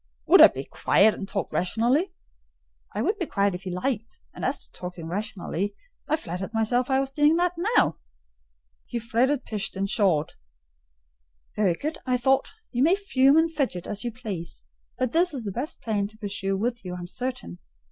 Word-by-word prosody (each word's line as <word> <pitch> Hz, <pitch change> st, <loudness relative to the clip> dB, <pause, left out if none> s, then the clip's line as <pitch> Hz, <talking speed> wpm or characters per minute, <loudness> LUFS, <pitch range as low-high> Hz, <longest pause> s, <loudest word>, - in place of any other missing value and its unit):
"Would -, -, +7 dB
I -, -, +12 dB
be -, -, -6 dB
quiet 210 Hz, +2 st, +3 dB
and 195 Hz, -, -7 dB
talk 195 Hz, -5 st, -3 dB
rationally?" 245 Hz, -, +1 dB, 0.8 s
"I -, -, 0 dB
would 420 Hz, +1 st, 0 dB
be 350 Hz, -, -2 dB
quiet 200 Hz, -1 st, +1 dB
if 180 Hz, -, -5 dB
he 185 Hz, -1 st, -5 dB
liked, 220 Hz, +5 st, -3 dB
and -, -, -8 dB
as -, -, 0 dB
to -, -, -23 dB
talking 180 Hz, -2 st, -7 dB
rationally, 200 Hz, +1 st, -3 dB, 0.3 s
I 305 Hz, -, +2 dB
flattered 190 Hz, -, -5 dB
myself 240 Hz, +3 st, +1 dB
I 265 Hz, 0 st, +3 dB
was 270 Hz, 0 st, -2 dB
doing 295 Hz, +2 st, +4 dB
that 350 Hz, +1 st, +2 dB, 0.2 s
now." -, -, +3 dB, 0.9 s
He -, -, -3 dB
fretted, 240 Hz, +4 st, +1 dB
pished, 210 Hz, -3 st, -3 dB
and 195 Hz, +1 st, -1 dB
pshawed. 180 Hz, -8 st, +2 dB, 1.2 s
"Very 195 Hz, -5 st, +2 dB
good," 305 Hz, -, -4 dB
I 255 Hz, -1 st, +1 dB
thought; 265 Hz, +2 st, +2 dB, 0.2 s
"you 245 Hz, -, -1 dB
may 330 Hz, +7 st, +5 dB
fume 280 Hz, -8 st, +3 dB
and 325 Hz, 0 st, +3 dB
fidget 260 Hz, -, -2 dB
as 205 Hz, -1 st, -4 dB
you 240 Hz, -, -2 dB
please: 190 Hz, -, -7 dB, 0.3 s
but 255 Hz, -2 st, 0 dB
this 340 Hz, -1 st, +2 dB
is 250 Hz, -, -4 dB
the 205 Hz, -, -3 dB
best 250 Hz, +10 st, -4 dB
plan 205 Hz, -3 st, 0 dB
to 215 Hz, +1 st, -17 dB
pursue 195 Hz, -2 st, -2 dB
with 235 Hz, +3 st, -2 dB
you, 180 Hz, -1 st, -5 dB
I -, -, -6 dB
am 175 Hz, -, -6 dB
certain. 195 Hz, -, -5 dB
225 Hz, 190 wpm, -26 LUFS, 195-270 Hz, 1.2 s, I